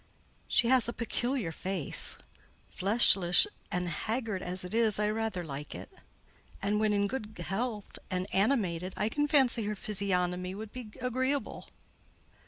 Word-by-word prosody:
"She 235 - +2
has 250 -1 +5
a - - -4
peculiar 240 -4 -2
face; 185 -1 +1 0.5
fleshless 195 -3 +6 0.3
and 180 0 -2
haggard 215 +3 -3
as 180 +1 -1
it 180 - -7
is, 225 -2 +2
I 210 0 0
rather 220 -4 -3
like 145 -2 -7
it; - - -10 0.7
and 205 +1 -1
when 215 -1 +1
in 200 -1 +1
good 215 -1 -6
health 205 +4 -4
and 185 -1 -2
animated, 190 -5 0
I 210 - 0
can 295 +5 -1
fancy 265 -7 +2
her 210 +1 -3
physiognomy 185 -3 -2
would 215 +1 -8
be 250 -4 -8
agreeable." 260 +3 -2
210 Hz, 145 wpm, -30 LUFS, 185-235 Hz, 0.7 s, fleshless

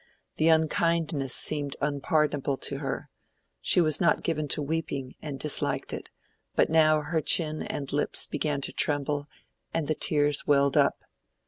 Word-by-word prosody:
The 155 - +2
unkindness 160 -3 +1
seemed 145 -2 +3
unpardonable 145 -1 0
to - - -4
her: - - -5 0.5
she - - +3
was 155 -3 +2
not 170 - +2
given 155 -2 -1
to 150 - +1
weeping 140 -4 -3
and 145 -3 -6
disliked 150 +2 -1
it, - - -7 0.5
but - - +2
now 155 -1 +4
her 160 +2 -1
chin 155 0 +1
and 140 -1 -4
lips 145 - +1
began 150 -1 -2
to - - -4
tremble 145 0 0 0.5
and 165 -3 -1
the 155 - +1
tears 145 -1 +1
welled 140 -1 +3
up. - - +2
150 Hz, 150 wpm, -27 LUFS, 140-160 Hz, 0.5 s, now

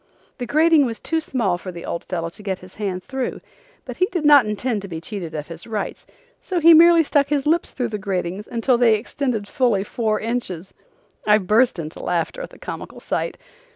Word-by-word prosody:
The 245 - -4
grating 310 +1 +4
was 225 -1 -5
too 325 - -1
small 230 - -1
for 185 - -7
the 170 -1 -9
old 170 - -4
fellow 170 -2 -3
to 210 - -13
get 195 -2 -3
his 185 - -15
hand 185 -3 -2
through, 265 -2 -4 0.5
but - - -7
he 370 - +3
did 345 -5 -3
not 290 -6 +7
intend 210 +1 -1
to 195 - -7
be 165 -3 -5
cheated 170 -2 -6
of 150 -1 -5
his 165 +3 -9
rights, 215 -3 -4 0.3
so 365 -2 -2
he 335 +1 +8
merely 335 +1 +7
stuck 285 -1 +2
his 285 -2 0
lips 325 +3 +2
through 245 -2 -2
the 210 -1 -4
gratings 190 0 -3
until 240 +1 +1
they 230 -3 +5
extended 225 -1 -3
fully 240 -8 +1
four 215 0 -1
inches. 215 -7 -4 0.5
I 210 0 +6
burst 215 +4 +2
into 160 -1 -6
laughter 175 - -2
at - - -6
the - - -16
comical - - -8
sight. - - -3
220 Hz, 210 wpm, -22 LUFS, 185-280 Hz, 0.5 s, he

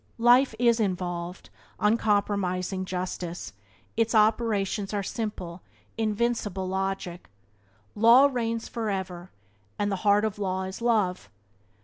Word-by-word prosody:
Life 240 +1 +5
is 235 0 +3
uninvolved, 180 -3 -3 0.3
uncompromising 200 -4 +1
justice; 180 -5 -5 0.4
its 225 0 +1
operations 210 -2 +1
are 200 - -1
simple, 190 -5 -5 0.3
invincible 215 -3 -1
logic. 190 -2 -3 0.6
Law 235 +5 +7
reigns 230 -4 -1
forever, 190 -5 -4 0.5
and 205 0 0
the 195 - -1
heart 205 +2 +3
of 210 -1 -3
law 190 -1 -1
is 190 +3 -6
love. 205 - +1
205 Hz, 105 wpm, -27 LUFS, 185-225 Hz, 0.6 s, Law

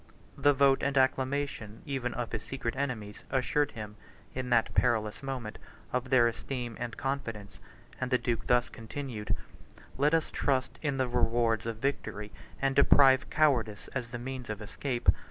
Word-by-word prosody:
The 145 -1 +4
vote 135 0 +4
and 140 0 0
acclamation 130 -4 0
even 130 -3 -2
of 120 -1 -3
his 110 - -2
secret 125 -2 -4
enemies, 120 -7 -3
assured 135 +2 +1
him, 105 -2 -7 0.4
in 130 -1 -3
that 115 -2 +3
perilous 110 -4 +1
moment, 130 -6 -5 0.3
of 125 0 -1
their 120 -3 +6
esteem 120 0 -4
and 120 -2 -4
confidence; 115 -7 -4 0.4
and 130 - -1
the 125 - +4
duke 120 -2 -2
thus 125 0 +4
continued: 115 -2 -4 0.6
"Let 150 +3 +4
us 160 - 0
trust 130 -2 0
in 140 -3 -1
the 130 -1 +1
rewards 115 -2 +1
of 115 -1 -3
victory, 110 -5 -3 0.3
and 135 0 +1
deprive 135 -1 +6
cowardice 120 -9 +2
of 125 -3 -3
the 120 - -5
means 125 0 -6
of 105 -1 -3
escape. 120 +4 -4
125 Hz, 160 wpm, -30 LUFS, 115-135 Hz, 0.6 s, their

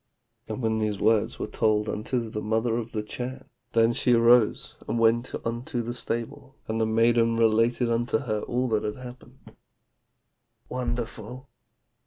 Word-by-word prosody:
"' 115 0 -50
"When 110 0 -1
these 105 -2 -1
words 110 -2 +2
were - - -3
told 105 -1 +1
unto 115 +3 -2
the 105 -1 -5
mother 110 +2 0
of 115 -1 -4
the 105 -1 -3
Chan, 130 +4 -6 0.3
then 115 0 +4
she 125 - +2
arose 115 -1 +4
and - - -1
went 115 +2 +2
unto 120 +2 -3
the 120 +1 -4
stable, 125 +3 -5
and 110 +1 -1
the 110 - +2
maiden 115 +1 +3
related 115 +2 +3
unto 115 0 +1
her 110 -4 -2
all 125 +1 -1
that 110 -2 +1
had 105 - -2
happened, 125 0 -13 1.1
'Wonderful!' 125 0 -4
115 Hz, 155 wpm, -26 LUFS, 110-120 Hz, 1.1 s, then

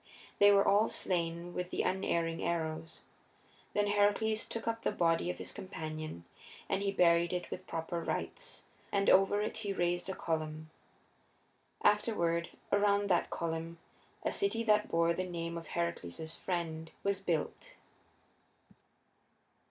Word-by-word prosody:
They 205 0 +8
were 200 0 +5
all 205 +3 +5
slain 170 -1 -1
with 180 0 -3
the - - -1
unerring 170 -3 0
arrows. 160 -1 -2 0.7
Then 205 - +3
Heracles 205 +2 +2
took 230 - -5
up 230 0 -1
the - - +1
body 165 0 +2
of 180 - -3
his - - -5
companion 155 - -6 0.4
and 195 - 0
he 200 0 +1
buried 170 -2 +4
it 180 -1 -3
with 185 - -6
proper 165 +1 -3
rights, - - -4 0.3
and 200 -1 +3
over 195 +2 +5
it 215 - -3
he 205 -3 -2
raised 175 0 0
a 190 - -2
column. 155 -1 -3 1.1
Afterward, 170 -6 +2 0.2
around 205 0 +3
that 175 - +3
column 165 0 -3 0.5
a - - +1
city 400 - +1
that 210 -2 +3
bore 170 0 +3
the 185 - -2
name 170 -2 -4
of 165 -1 -6
Heracles's 160 - -3
friend 165 -3 -3
was 200 -1 +1
built. 170 -6 -2
175 Hz, 140 wpm, -33 LUFS, 165-200 Hz, 1.1 s, They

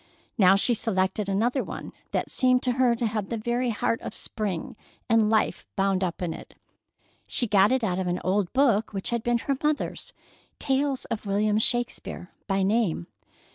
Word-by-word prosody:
Now 190 -2 +6
she 220 +5 +3
selected 200 -2 0
another 235 +7 +1
one - - -7 0.2
that - - -2
seemed 255 0 +3
to 250 - +1
her 245 -1 +3
to 235 0 -2
have 215 -3 -2
the 230 - -2
very 240 +3 -1
heart 230 +1 -1
of - - -7
spring 200 -7 -4 0.3
and 225 -2 +3
life 220 -1 +1
bound 195 -1 +1
up 180 0 -3
in 170 -2 -2
it. - - -11 0.7
She 245 - +2
got 205 0 +4
it 260 -2 +1
out 185 -4 0
of 185 - -2
an 175 0 -1
old 190 0 0
book 235 -6 +2
which 195 +4 -2
had 235 -1 0
been 240 +1 +1
her 275 +4 -1
mother's—"Tales 285 - -2
of 215 -2 -5
William 210 +2 +2
Shakespeare," 240 -6 -1 0.2
by 195 -1 +1
name. 195 - +1
220 Hz, 175 wpm, -26 LUFS, 195-240 Hz, 0.7 s, Now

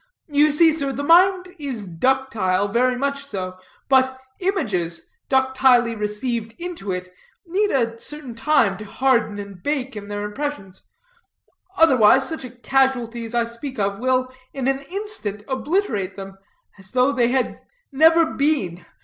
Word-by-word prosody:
You 295 +1 +4
see 320 +2 +5
sir, 280 -3 -2
the 280 +1 -4
mind 365 +3 +4
is 260 -8 -4
ductile, 205 0 0
very 250 +4 +2
much 280 +1 -2
so: 185 -8 -6 0.3
but 260 -1 +3 0.2
images, 200 - -1 0.2
ductilely 260 -3 +3
received 220 +2 -3
into 340 - -5
it, 180 0 -5 0.3
need 395 +5 +1
a 230 -6 0
certain 295 -3 -7
time 230 -6 +2
to - - -6
harden 235 -1 +1
and 200 -3 -9
bake 270 -2 -2
in 205 -1 -7
their 205 0 -4
impressions, 210 -4 -5 1.0
otherwise 265 -4 +5
such 320 -4 -5
a 255 - -7
casualty 245 -2 0
as 225 +1 -6
I 235 -1 +2
speak 240 +3 -7
of 200 -1 -1
will 255 +1 0 0.2
in 265 -2 -2
an 270 0 +1
instant 370 - -5
obliterate 265 - -1
them, 195 -1 -9 0.4
as 190 -1 -9
though 255 +2 +3
they 245 -4 +2
had 255 +1 -1 0.3
never 325 +4 +5
been. 270 - -1
255 Hz, 150 wpm, -22 LUFS, 210-285 Hz, 1.0 s, see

